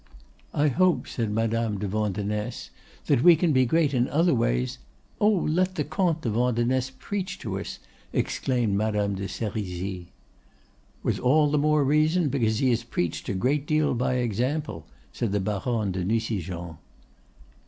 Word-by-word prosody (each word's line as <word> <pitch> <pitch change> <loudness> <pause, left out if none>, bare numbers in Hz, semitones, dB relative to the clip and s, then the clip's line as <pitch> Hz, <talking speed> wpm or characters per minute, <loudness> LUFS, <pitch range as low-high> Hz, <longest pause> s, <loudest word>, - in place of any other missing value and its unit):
"I 145 +1 +3
hope," 180 +5 +2
said 115 -3 -2
Madame 115 0 0
de 100 +1 -3
Vandenesse, 105 +2 -2 0.3
"that - - +3
we 175 +3 +8
can 160 -1 +1
be 130 -1 +4
great 155 +1 +2
in 125 -1 +1
other 165 +3 +3
ways——" 60 - 0 0.4
"Oh, 210 - +5
let 185 -1 +1
the 150 - 0
Comte 160 +2 0
de 115 - 0
Vandenesse 125 +3 +1
preach 200 -2 -4
to - - -4
us!" - - -6 0.3
exclaimed 120 -6 0
Madame 105 0 0
de 95 0 -4
Serizy. 95 -5 -4 1.0
"With - - 0
all 145 +3 +3
the 150 - +2
more 150 0 +3
reason 155 +3 +2
because 115 -5 +1
he 130 +1 +2
has 120 -1 +1
preached 90 -8 -3
a 100 - -1
great 135 +8 0
deal 155 -2 +2
by 125 +1 0
example," 125 - -2 0.3
said 115 -4 -2
the 105 - +2
Baronne 105 +1 -1
de 90 0 -2
Nucingen. 90 -6 -2
120 Hz, 155 wpm, -26 LUFS, 105-150 Hz, 1.0 s, we